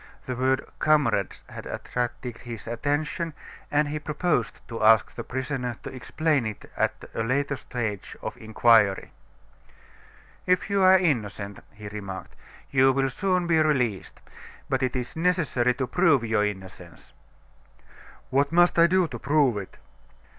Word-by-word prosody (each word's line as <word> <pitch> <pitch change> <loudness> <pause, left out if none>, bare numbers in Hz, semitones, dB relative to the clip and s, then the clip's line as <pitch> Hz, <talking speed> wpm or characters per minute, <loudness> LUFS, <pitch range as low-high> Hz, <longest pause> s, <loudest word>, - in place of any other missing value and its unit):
The 130 - -3
word 130 +1 +1
"comrades" 135 -11 +2
had - - -9
attracted 120 -1 -4
his 115 -3 -8
attention, 145 +7 -2 0.3
and 150 +1 +2
he 150 +1 -3
proposed 150 -5 -1
to 115 -1 -5
ask 110 0 +5
the 120 - -6
prisoner 130 -1 -3
to - - -7
explain 140 0 0
it 105 - -7
at - - -1
a - - -2
later 140 +5 0
stage 115 -6 -5
of - - -5
the - - -16
inquiry. 110 -3 +3 1.4
"If 180 +2 +1
you 200 -1 +2
are 190 0 +7
innocent," 105 - -1
he 105 -1 -10
remarked, 100 -2 -7 0.4
"you 135 0 +5
will 135 0 0
soon 185 +4 0
be 165 -2 +3
released: 125 -10 0 0.5
but - - 0
it 130 -1 0
is 125 -1 -4
necessary 160 -8 +1
to 130 - -1
prove 160 -4 +3
your 110 -2 +1
innocence." 95 -3 -9 1.2
"What 140 +2 +2
must 175 0 +4
I 170 - +7
do 185 0 +3
to 120 -6 -7
prove 140 -3 +2
it?" 100 -2 -7
130 Hz, 145 wpm, -26 LUFS, 115-155 Hz, 1.4 s, are